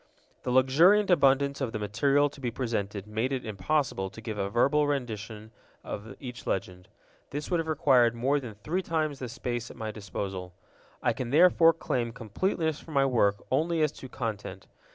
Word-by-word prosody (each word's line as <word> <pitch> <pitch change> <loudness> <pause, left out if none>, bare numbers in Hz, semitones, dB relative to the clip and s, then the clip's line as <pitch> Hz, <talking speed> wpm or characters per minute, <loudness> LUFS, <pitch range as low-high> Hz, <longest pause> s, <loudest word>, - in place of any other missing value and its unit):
The - - -4
luxuriant 165 +11 +5
abundance 140 -3 +3
of 125 -3 -2
the - - -1
material 135 +8 +2
to 140 -1 -12
be 125 - -1
presented 110 -5 -3
made 110 +5 -2
it 130 -2 -2
impossible 105 0 -1
to 110 - -12
give 110 -1 -5
a 100 -1 -2
verbal 140 +7 +3
rendition 110 -5 -4 0.3
of 105 +3 -7
each 125 -3 -8
legend. 90 -1 -3 0.4
This 145 +4 -5
would 175 - +2
have 165 - -2
required 130 -6 +4
more 135 +5 +1
than 120 -6 -8
three 155 - -2
times 155 -5 -1
the 125 - -5
space 120 0 -4
at - - -12
my 110 -1 -4
disposal. 95 -3 -6 0.5
I - - +3
can 125 - -4
therefore 165 +2 +6
claim 120 -7 -2
completeness 160 - -1
for - - -15
my 140 -3 +3
work 105 -6 +2
only 160 +4 +2
as 150 - +2
to 130 -3 -11
content. 110 -3 -5
125 Hz, 180 wpm, -28 LUFS, 110-145 Hz, 0.5 s, therefore